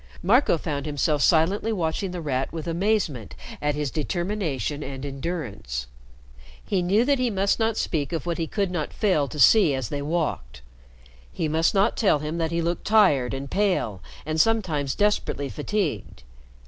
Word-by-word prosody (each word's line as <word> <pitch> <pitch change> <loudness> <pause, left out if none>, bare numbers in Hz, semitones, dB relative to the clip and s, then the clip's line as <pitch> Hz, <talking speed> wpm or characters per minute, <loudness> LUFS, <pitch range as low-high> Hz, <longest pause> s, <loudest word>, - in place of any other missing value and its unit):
Marco 215 0 +4
found 150 -2 -4
himself 145 0 0
silently 180 +9 +3
watching 180 -1 -1
The 180 -1 -5
Rat 135 -3 -2
with 160 -2 -6
amazement 170 - -1 0.3
at 150 0 0
his 145 -3 -2
determination 155 - -2
and 135 -1 -6
endurance. 130 - -4 0.8
He 190 -3 0
knew 200 +7 +2
that 280 -1 +2
he 250 -1 +1
must 195 0 +1
not 225 0 +1
speak 145 -4 -1
of 165 0 -3
what 170 0 -2
he 165 - -1
could 200 -1 -1
not 165 -4 -3
fail 185 -10 +1
to 150 - -8
see 155 - +6
as 130 -5 -3
they 145 - -3
walked. 140 - -3 0.7
He 160 - -2
must 160 +5 +1
not 200 +4 +3
tell 200 -9 +3
him 155 +3 -4
that 165 -1 0
he 170 0 -1
looked 170 +1 -2
tired 150 - +4
and 135 +1 -5
pale 180 - 0 0.2
and 155 +1 +2
sometimes 165 -12 0
desperately 205 -9 0
fatigued. 150 - -3
160 Hz, 170 wpm, -25 LUFS, 140-195 Hz, 0.8 s, see